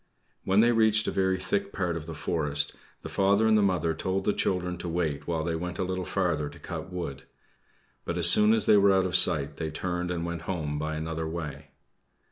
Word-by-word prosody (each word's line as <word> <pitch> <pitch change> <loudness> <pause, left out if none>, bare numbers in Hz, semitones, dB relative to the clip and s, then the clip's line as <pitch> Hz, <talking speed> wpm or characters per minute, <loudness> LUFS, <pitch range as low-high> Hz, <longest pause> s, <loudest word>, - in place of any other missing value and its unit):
When 95 +2 +4
they 120 +1 +4
reached 110 -2 +3
a - - 0
very 95 -1 +1
thick 100 +2 -2
part 90 -4 -2
of 80 -1 -6
the 80 - -6
forest, 75 -2 -1 0.3
the - - -5
father 100 +3 +2
and 110 0 +4
mother 90 -5 +1
told 95 +3 -2
the 105 - +2
children 90 -1 -1
to 90 - -5
wait 80 -4 -2
while 80 -2 -1
they 85 +1 -2
went 90 +2 -5
a 95 - -1
little 95 0 -3
farther 85 -6 -1
to - - -14
cut 95 - -7
wood, 85 -7 -6 0.8
but 85 - -4
as 85 -1 +6
soon 105 +4 +7
as 110 - +2
they 105 - +5
were 100 0 +5
out 95 -1 +2
of 90 - -2
sight 70 -3 +3
they 80 -1 -3
turned 90 +2 -3
and 85 -1 -3
went 85 -1 -4
home 75 -5 -3
by 80 +1 -3
another 80 +1 -4
way. 80 -3 -6
90 Hz, 220 wpm, -27 LUFS, 80-95 Hz, 0.8 s, soon